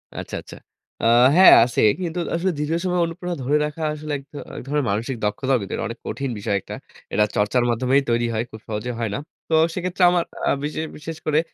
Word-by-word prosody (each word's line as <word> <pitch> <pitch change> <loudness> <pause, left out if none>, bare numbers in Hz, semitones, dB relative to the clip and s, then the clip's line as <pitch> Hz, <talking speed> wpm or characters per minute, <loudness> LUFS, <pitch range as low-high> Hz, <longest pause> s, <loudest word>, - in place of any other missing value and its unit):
আচ্ছা, - - -6
আচ্ছা। - - -12 0.5
আ - - +2 0.3
হ্যাঁ, 185 +1 +9
আছে। 120 0 0 0.2
কিন্তু 175 0 -3 0.2
আসলে 185 +2 0
দীর্ঘ 150 +1 -2
সময় 180 -1 +1
অনুপ্ররণা 175 +1 -5
ধরে 145 +4 +2
রাখা 150 +2 -6
আসলে 155 0 -6
এক 135 - -12
ধর 145 - -6 0.2
এক - - -5
ধরনের 145 -1 0
মানসিক 115 +6 -2
দক্ষতার 130 +6 +1
ভিতর। 100 - -4
অনেক - - -7
কঠিন 135 -1 -3
বিষয় 100 0 -1
একটা। - - -8 0.4
এটা 105 - +4
চর্চার 105 +4 +2
মাধ্যমেই 130 +4 +2
তৈরি 120 0 +2
হয়। 110 - 0
খুব 110 - -10
সহজে 110 +3 -3
হয় 115 - -1
না। - - -2 0.3
তো - - -1 0.2
সেক্ষেত্রে 180 +1 -1
আমার 175 -1 +2 0.2
আ - - +2
বিশেষ 155 +2 -3
বিশেষ 160 +1 -7
করে 155 0 +3
145 Hz, 210 wpm, -22 LUFS, 115-165 Hz, 0.5 s, হ্যাঁ